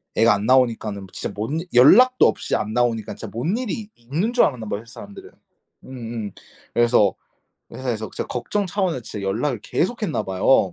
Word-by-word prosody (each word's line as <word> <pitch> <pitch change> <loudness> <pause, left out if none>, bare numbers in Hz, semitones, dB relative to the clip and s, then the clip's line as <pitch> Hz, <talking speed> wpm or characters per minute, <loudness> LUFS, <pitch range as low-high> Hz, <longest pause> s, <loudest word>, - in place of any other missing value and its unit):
애가 115 0 +5
안 100 +1 -2
나오니까는 115 -6 +2
진짜 - - -4
뭔 130 +10 -2
연락도 245 - +7
없이 - - -1
안 110 +1 -2
나오니까 115 -3 0
진짜 - - -8
뭔 145 - -1
일이 225 -4 -4
있는 155 - -2
줄 245 - +5
알았나 125 -6 -3
봐요 100 +1 -3
회사 115 - -15
사람들은. 100 0 -11 0.5
음음 115 -5 -6 0.4
그래서 120 -5 +4 0.6
회사에서 120 -4 -4
진짜 - - -3
걱정 200 - -2
차원에 185 -6 -1
진짜 105 -2 -7
연락을 115 +5 -1
계속했나 205 - -1
봐요. 95 +1 +2
120 Hz, 375 characters per minute, -22 LUFS, 110-160 Hz, 0.6 s, 연락도